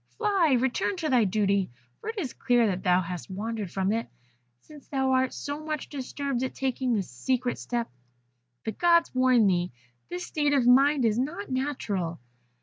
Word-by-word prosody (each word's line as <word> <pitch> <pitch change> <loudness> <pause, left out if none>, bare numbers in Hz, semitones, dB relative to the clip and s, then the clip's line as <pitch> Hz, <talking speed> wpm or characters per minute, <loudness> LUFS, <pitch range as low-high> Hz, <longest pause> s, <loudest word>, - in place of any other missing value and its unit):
Fly, 385 - +3
return 265 +10 0
to 325 -4 -2
thy 245 -5 +4
duty, 200 -1 +1 0.3
for - - -6
it 450 - -5
is 295 - -3
clear 245 -1 +2
that 185 -3 -1
thou 180 0 +3
hast 180 +1 -6
wandered 210 +1 -4
from 190 +2 0
it, 230 +1 -2 0.5
since 295 - -15
thou 265 -1 0
art 260 0 +2
so 290 +2 -5
much 305 -2 -4
disturbed 275 -1 -3
at 260 - -3
taking 260 -2 0
this 195 -4 -1
secret 245 - -1
step. 240 -1 -2 0.8
The 220 - -1
Gods 340 - +3
warn 255 -3 +4
thee. 180 -2 +1 0.4
This 180 0 -4
state 295 -2 0
of 270 -4 +3
mind 270 +2 +5
is 220 +1 +2
not 330 +9 -3
natural.' 210 - -2
255 Hz, 175 wpm, -27 LUFS, 205-285 Hz, 0.8 s, mind